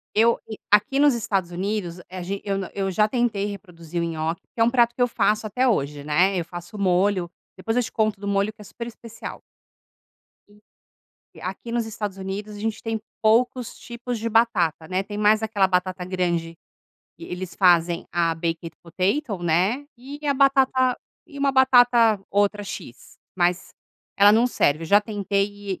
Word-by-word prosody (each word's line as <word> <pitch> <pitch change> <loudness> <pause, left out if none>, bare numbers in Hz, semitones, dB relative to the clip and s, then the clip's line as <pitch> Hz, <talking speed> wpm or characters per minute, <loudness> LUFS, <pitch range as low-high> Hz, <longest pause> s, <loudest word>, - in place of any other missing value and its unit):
Eu 230 +2 +4
e 220 - -8
aqui 210 +7 +4
nos 290 -3 +5
Estados 200 -6 -1
Unidos, 185 -1 -3
a 185 0 -6
g 195 +3 -4
eu 195 -1 -1
na 190 -2 -5
eu 195 -1 -1
já 210 +3 +2
tentei 225 -4 0
reproduzir 175 -5 -6
o - - 0
nhoque, 165 0 -3
que - - -6
é 225 - +6
um 235 - +3
prato 240 -2 +3
que 250 - -11
eu 245 - +4
faço 215 -2 +1
até 250 +5 0
hoje, 145 - 0
né? 180 +6 +2
Eu 170 - -2
faço 175 +4 -9
o - - -7
molho, 185 -1 +2 0.3
depois 225 +5 -3
eu - - +3
te - - -5
conto 215 -2 0
do 200 - -4
molho 200 +1 +1
que 215 - -23
é - - -10
super 235 +4 -8
especial. 230 -1 -9 1.9
E - - -14
aqui 195 +5 -6
nos 235 -1 0
Estados 210 -3 -5
Unidos 200 +2 -5
a - - -9
gente 220 0 -3
tem 225 -1 -3 0.2
poucos 235 +2 +2
tipos 240 0 -6
de 225 +1 -2
batata, 210 -9 +2
né, 185 +3 -1
tem 205 +1 -8
mais 210 +1 +3
aquela 205 -3 +2
batata 180 0 -1
grande 170 -2 -2 0.6
que - - -16
eles 180 - -6
fazem 175 -2 +3
a 165 -1 +1
baked 165 0 -3
potato, 195 - -1
né, 185 - +1
e 270 +4 -9
a 280 - +2
batata 265 -2 +3 0.3
e 285 - -11
uma 280 0 +2
batata, 245 -5 +5
outra 205 +1 +1
x, 195 -11 -9 0.2
mas 180 0 0 0.4
ela 200 +1 +7
não 230 +3 +4
serve. 155 -10 +1
Eu - - -5
já 205 +5 +5
tentei 205 -2 -2
205 Hz, 185 wpm, -23 LUFS, 180-230 Hz, 1.9 s, ela